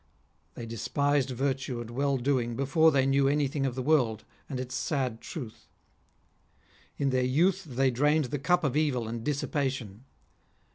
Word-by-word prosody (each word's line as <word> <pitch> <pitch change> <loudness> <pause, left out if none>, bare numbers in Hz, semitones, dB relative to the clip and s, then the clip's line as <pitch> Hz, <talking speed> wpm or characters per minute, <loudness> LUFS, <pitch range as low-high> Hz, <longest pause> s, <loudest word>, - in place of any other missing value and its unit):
They 120 - -6
despised 140 +4 0
virtue 135 -1 -2
and 120 0 -7
well 140 +2 0
doing 120 -2 0
before 145 +5 +4
they 135 -2 +2
knew 135 0 +3
any 145 0 +2
thing 135 0 -1
of 125 - -4
the 130 - -3
world, 125 -7 +2 0.3
and. 130 -3 -4
its 130 0 -5
sad 125 -3 -2
truth. 125 -10 -8 1.3
In 140 -1 +1
their 130 0 +2
youth 160 +9 +2
they 135 -2 +1
drained 150 +4 +2
the 145 - 0
cup 175 +5 +2
of 140 -3 0
evil 140 -7 +1
and 115 0 -5
dissipation. 135 -6 -2
135 Hz, 160 wpm, -28 LUFS, 125-145 Hz, 1.3 s, before